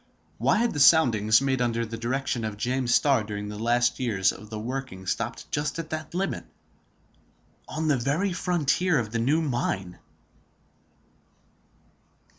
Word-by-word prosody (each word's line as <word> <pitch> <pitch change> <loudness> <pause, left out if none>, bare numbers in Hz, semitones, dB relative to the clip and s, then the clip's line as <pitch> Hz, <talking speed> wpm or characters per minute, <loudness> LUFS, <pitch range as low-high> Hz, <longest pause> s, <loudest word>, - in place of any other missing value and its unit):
Why - - +3
had 235 +1 +1
the 145 - -3
soundings 115 -7 +5
made 135 -2 0
under 115 -1 0
the 115 +1 -6
direction 120 +1 -2
of 110 -2 -4
James 125 +2 -1
Starr 135 -3 +4
during 105 -1 -5
the 105 0 -7
last 120 +1 +1
years 105 -7 +1
of 105 - -12
the 110 - -5
working 115 -4 -5
stopped - - -3
just 150 +2 -2
at 165 -1 -6
that 155 +1 -5
limit, 195 +1 -2 1.2
on 155 +1 -3
the 145 -3 +3
very 150 +10 0
frontier 175 -1 +1
of 110 -4 -2
the 115 - -1
new 145 +8 +2
mine? 95 - -2
125 Hz, 150 wpm, -26 LUFS, 110-150 Hz, 1.2 s, soundings